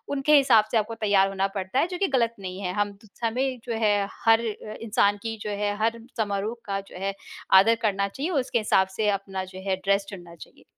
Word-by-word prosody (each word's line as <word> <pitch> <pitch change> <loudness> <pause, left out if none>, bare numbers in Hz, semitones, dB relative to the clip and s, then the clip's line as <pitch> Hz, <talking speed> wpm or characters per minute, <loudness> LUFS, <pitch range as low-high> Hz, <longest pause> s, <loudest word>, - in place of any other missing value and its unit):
उनके 285 +2 +4
हिसाब 245 -6 +5
से - - +3
आपको 220 +1 -1
तैयार 200 -3 +3
होना 195 0 0
पड़ता 190 +6 -1
है 325 - +2
जो 360 0 -5
कि 390 - +1
गलत 230 -1 +1
नहीं 185 -1 -6
है। 180 -2 -2
हम 205 0 -1 0.3
हमें 255 +3 -1
जो 240 - -3
है 205 -1 +2 0.2
हर 225 0 +6
अ, 215 -1 -5
इंसान 205 -2 +2
की 225 -1 -4
जो 210 - -4
है, 205 0 -1
हर 225 +2 0 0.2
समारोह 210 +1 -1
का 195 -2 -2
जो - - -11
है 195 - -1 0.5
आदर 225 +3 +3
करना 200 -1 +1
चाहिए 275 - -4
उसके 265 -7 0
हिसाब 190 -3 +3
से 215 -1 +2
अपना 190 -1 -5
जो 185 0 -10
है 190 - +2
ड्रेस 200 0 +2
चुनना 175 -4 -10
चाहिए। 165 - -15
210 Hz, 225 wpm, -25 LUFS, 195-230 Hz, 0.5 s, हर